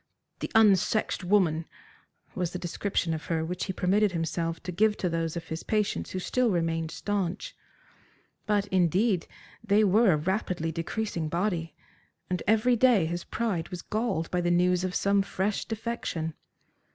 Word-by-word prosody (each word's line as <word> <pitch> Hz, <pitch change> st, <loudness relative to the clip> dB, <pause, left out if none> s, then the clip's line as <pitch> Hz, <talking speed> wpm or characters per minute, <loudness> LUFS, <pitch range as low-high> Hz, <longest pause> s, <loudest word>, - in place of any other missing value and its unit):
"The -, -, -4 dB
unsexed 215 Hz, -1 st, +3 dB
woman," 175 Hz, -4 st, +2 dB, 0.7 s
was 180 Hz, -2 st, -2 dB
the -, -, -2 dB
description 175 Hz, -1 st, -1 dB
of 155 Hz, -, -5 dB
her 160 Hz, -1 st, -1 dB
which 180 Hz, +2 st, -3 dB
he 190 Hz, -, -2 dB
permitted 195 Hz, +2 st, +2 dB
himself 165 Hz, 0 st, -2 dB
to 180 Hz, -, -4 dB
give 210 Hz, +4 st, +2 dB
to 180 Hz, -, -1 dB
those 165 Hz, 0 st, -2 dB
of 170 Hz, -, -7 dB
his 160 Hz, +1 st, -4 dB
patients 210 Hz, -2 st, -1 dB
who -, -, -4 dB
still 245 Hz, +6 st, +1 dB
remained 165 Hz, -3 st, 0 dB
staunch. 195 Hz, +1 st, -3 dB, 0.9 s
But, 205 Hz, -1 st, +2 dB
indeed, 185 Hz, +2 st, +2 dB, 0.4 s
they 215 Hz, 0 st, +4 dB
were 205 Hz, 0 st, +5 dB
a -, -, +2 dB
rapidly 175 Hz, -1 st, -1 dB
decreasing 165 Hz, 0 st, -3 dB
body, 170 Hz, -1 st, -1 dB, 0.6 s
and 180 Hz, -, 0 dB
every 220 Hz, +4 st, +4 dB
day 235 Hz, -7 st, +4 dB
his 175 Hz, +2 st, -3 dB
pride 205 Hz, -8 st, -2 dB
was 180 Hz, -1 st, -6 dB
galled 215 Hz, -7 st, -2 dB
by 180 Hz, -, +1 dB
the 175 Hz, -, 0 dB
news 180 Hz, +1 st, +3 dB
of 185 Hz, -1 st, -2 dB
some 200 Hz, 0 st, +3 dB
fresh 195 Hz, +1 st, -2 dB
defection. 225 Hz, -8 st, -3 dB
180 Hz, 160 wpm, -28 LUFS, 165-210 Hz, 0.9 s, were